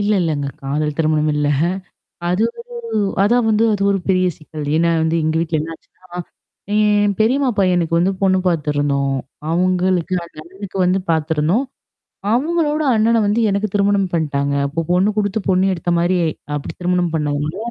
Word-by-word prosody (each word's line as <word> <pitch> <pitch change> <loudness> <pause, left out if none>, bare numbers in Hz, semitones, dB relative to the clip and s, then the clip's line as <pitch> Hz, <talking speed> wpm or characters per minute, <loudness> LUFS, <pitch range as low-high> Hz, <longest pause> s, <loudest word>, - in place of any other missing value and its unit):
இல்ல 205 +1 +1
இல்லங்க. 150 -4 -1 0.2
காதல் 150 +2 -1
திருமணம் 155 -1 +2
இல்ல. 150 0 0 0.8
அது 180 +5 +1 0.3
ஒரு 475 -1 -7 0.3
அதா 230 +4 +3
வந்து 215 +1 +3
அது 200 -1 -1
ஒரு 195 - 0
பெரிய 185 -1 +3
சிக்கல். 155 -1 -8
ஏன்னா 170 +1 +2
வந்து 160 +1 +1
எங்க 155 +1 0
வீட்ல 165 -2 -1
என்ன 165 +2 -6
ஆச்சுன்னா? 180 +2 -12 0.5
என் 210 -1 +3
பெரியம்மா 255 +5 +2
பையன்னுக்கு 175 -3 +2
வந்து 180 +3 +2
பொண்ணு 190 -1 +3
பார்த்தருந்தோம். 145 -4 0 0.4
அவங்களுக்கு 185 0 +1
அந்த 170 - -19
அண்ணனுக்கு 190 +3 -9
வந்து 185 +2 +2
பார்த்துருந்தோம். 160 - +1 0.7
அவங்களோட 310 +2 +1
அண்ணன 225 +1 +3
வந்து 210 +3 +1
எனக்கு 200 +2 0
திருமணம் 200 -2 +2
பண்டாங்க. 140 -3 0
அப்போ 150 +4 -3
பொண்ணு 185 +4 +3
குடுத்து 205 +1 0
பொண்ணு 185 0 +3
எடுத்த 175 0 -3
மாரி 175 +2 +2 0.4
அப்படி 140 - -5
திருமணம் 180 -1 0
பண்ணதுனால 150 +2 -2
180 Hz, 150 wpm, -19 LUFS, 155-205 Hz, 0.8 s, அதா